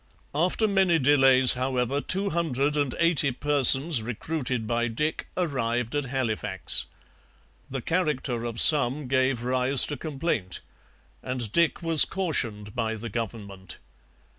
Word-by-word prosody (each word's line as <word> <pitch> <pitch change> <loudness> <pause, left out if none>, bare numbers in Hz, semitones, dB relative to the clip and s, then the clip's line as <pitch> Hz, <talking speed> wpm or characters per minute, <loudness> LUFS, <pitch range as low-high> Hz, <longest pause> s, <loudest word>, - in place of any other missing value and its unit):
After 180 +8 -1
many 190 -4 +1
delays, 135 -2 +4
however, 130 +1 -3
two 195 +5 -2
hundred 150 -3 -2
and 145 -4 -2
eighty 165 -5 +1
persons 140 +1 +6
recruited 125 +1 -5
by 120 +1 -2
Dick 150 +7 -4
arrived 125 -8 -3
at 145 -1 -3
Halifax. 115 - -1 0.8
The 135 -1 -6
character 145 -8 -3
of 115 -1 -6
some 145 -2 +4
gave 130 -2 -1
rise 130 +1 +4
to 145 - -6
complaint, 140 - -4 0.6
and 125 -4 -4
Dick 170 +3 -1
was 165 -2 +5
cautioned 115 - -2
by 115 -2 -4
the 115 +2 -8
government. 100 -5 -8
130 Hz, 125 wpm, -24 LUFS, 120-150 Hz, 0.8 s, persons